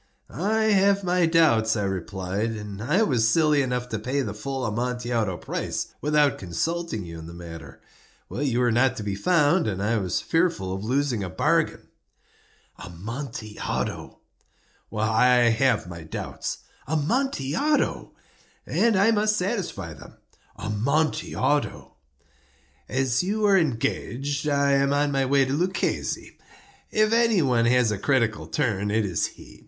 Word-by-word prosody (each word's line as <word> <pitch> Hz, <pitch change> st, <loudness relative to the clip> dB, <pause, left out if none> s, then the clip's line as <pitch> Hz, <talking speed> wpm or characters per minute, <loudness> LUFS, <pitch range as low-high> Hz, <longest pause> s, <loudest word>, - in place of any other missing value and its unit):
"I 215 Hz, +6 st, 0 dB
have 200 Hz, -2 st, +3 dB
my 180 Hz, -1 st, +2 dB
doubts," 120 Hz, -10 st, +3 dB
I 105 Hz, -, -1 dB
replied; 95 Hz, +3 st, -2 dB
"and 105 Hz, -2 st, -7 dB
I 150 Hz, -, +2 dB
was 120 Hz, -, +2 dB
silly 150 Hz, 0 st, +3 dB
enough 125 Hz, -2 st, -2 dB
to 110 Hz, -, -3 dB
pay 130 Hz, +5 st, -1 dB
the 105 Hz, -5 st, -4 dB
full 135 Hz, +5 st, -4 dB
Amontillado 120 Hz, -3 st, -1 dB
price -, -, -4 dB
without 150 Hz, -1 st, +2 dB
consulting 110 Hz, -, -3 dB
you 85 Hz, -1 st, -8 dB
in 80 Hz, -, -9 dB
the 85 Hz, -, -10 dB
matter. 80 Hz, -4 st, -10 dB, 0.5 s
You 125 Hz, -2 st, 0 dB
were 120 Hz, -1 st, +3 dB
not 125 Hz, +2 st, +2 dB
to 110 Hz, -, -4 dB
be 100 Hz, -1 st, -2 dB
found, 155 Hz, -, +2 dB
and 95 Hz, -3 st, -2 dB
I 110 Hz, +3 st, +1 dB
was 95 Hz, -3 st, -1 dB
fearful 165 Hz, -, 0 dB
of 95 Hz, +1 st, -5 dB
losing 125 Hz, -2 st, 0 dB
a 95 Hz, -, -4 dB
bargain." -, -, 0 dB, 0.9 s
"Amontillado!" 110 Hz, -, -5 dB, 0.7 s
"I 110 Hz, +3 st, +3 dB, 0.2 s
have 120 Hz, 0 st, +2 dB
my 85 Hz, -1 st, -8 dB
doubts." 80 Hz, -, -5 dB, 0.2 s
"Amontillado!" 175 Hz, -, 0 dB, 0.5 s
"And 230 Hz, -2 st, +2 dB
I 200 Hz, +4 st, +4 dB
must 215 Hz, 0 st, +2 dB
satisfy 195 Hz, +1 st, -3 dB
them." -, -, -14 dB, 0.4 s
"Amontillado!" 140 Hz, +6 st, -1 dB, 1.0 s
"As 130 Hz, -1 st, +1 dB
you 210 Hz, +4 st, 0 dB
are 200 Hz, -1 st, +5 dB
engaged, 140 Hz, -, -1 dB
I 140 Hz, -1 st, +2 dB
am 140 Hz, 0 st, +3 dB
on 145 Hz, 0 st, +1 dB
my 135 Hz, -1 st, +1 dB
way 135 Hz, 0 st, +4 dB
to 130 Hz, -, -2 dB
Luchesi. 180 Hz, +5 st, -2 dB, 0.5 s
If 215 Hz, +1 st, +2 dB
any 230 Hz, -6 st, +3 dB
one 120 Hz, -4 st, +2 dB
has 125 Hz, -2 st, +3 dB
a 105 Hz, -, -3 dB
critical 115 Hz, -4 st, +1 dB
turn, 105 Hz, -8 st, -1 dB
it 110 Hz, +1 st, +1 dB
is 90 Hz, -4 st, 0 dB
he. -, -, -15 dB
130 Hz, 140 wpm, -25 LUFS, 105-160 Hz, 1.0 s, are